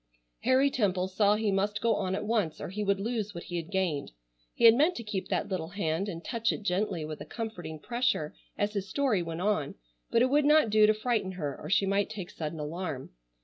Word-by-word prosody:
Harry 260 +2 +3
Temple 190 -7 +1
saw 200 +2 +3
he 215 -1 0
must 205 +2 0
go 230 0 +2
on 190 -2 -1
at 200 - -3
once 210 -8 0
or - - -5
he 210 +3 -3
would 200 -1 +1
lose 215 -1 -2
what 170 - -6
he 175 - -5
had 165 0 -5
gained. 180 - -1 0.4
He 235 - +3
had 225 - +10
meant 305 +9 +3
to 235 - -5
keep 210 -3 -3
that - - -1
little 180 -4 -3
hand 180 +1 -2
and 170 -3 -7
touch 230 -2 0
it - - -5
gently 185 -3 -1
with 155 0 -7
a - - -6
comforting 200 -9 -6
pressure 240 -8 0 0.2
as 205 +1 0
his 195 -2 -3
story 255 -6 +1
went 165 0 -4
on, 190 -8 0 0.3
but 235 - +4
it 255 - +2
would 295 +1 +4
not 300 -6 +5
do 215 0 +6
to 215 - +5
frighten 215 -4 -1
her 150 -6 -3
or - - -8
she 195 - +3
might 200 +1 +1
take 200 -5 -6
sudden 155 0 -5
alarm. 155 -2 -4
200 Hz, 230 wpm, -29 LUFS, 175-225 Hz, 0.4 s, had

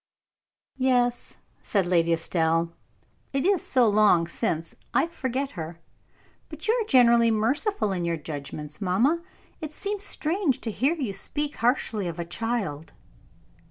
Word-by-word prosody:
"Yes," 245 -2 +1 0.2
said 200 -4 +1
Lady 170 -2 +2
Estelle. 165 0 +1 0.6
"It 275 +2 0
is 385 -4 +3
so 250 -3 +3
long 205 -5 +4
since, 165 -4 -2 0.2
I 285 - +4
forget 275 -4 -3
her; 165 -1 -7 0.7
but - - -8
you 440 - +4
are 465 -3 0
generally 235 - +5
merciful 230 - +1
in 180 -2 -2
your 170 -1 0
judgments, 150 +1 -7
mamma. 235 - +2 0.4
It 310 -1 -5
seems 405 +4 -3
strange 330 - 0
to 225 - -3
hear 270 +10 +1
you 260 -11 -3
speak 290 +9 -3
harshly 230 -4 +1
of 170 -1 -5
a 170 - -2
child." 185 -5 -3
225 Hz, 140 wpm, -26 LUFS, 170-275 Hz, 0.7 s, generally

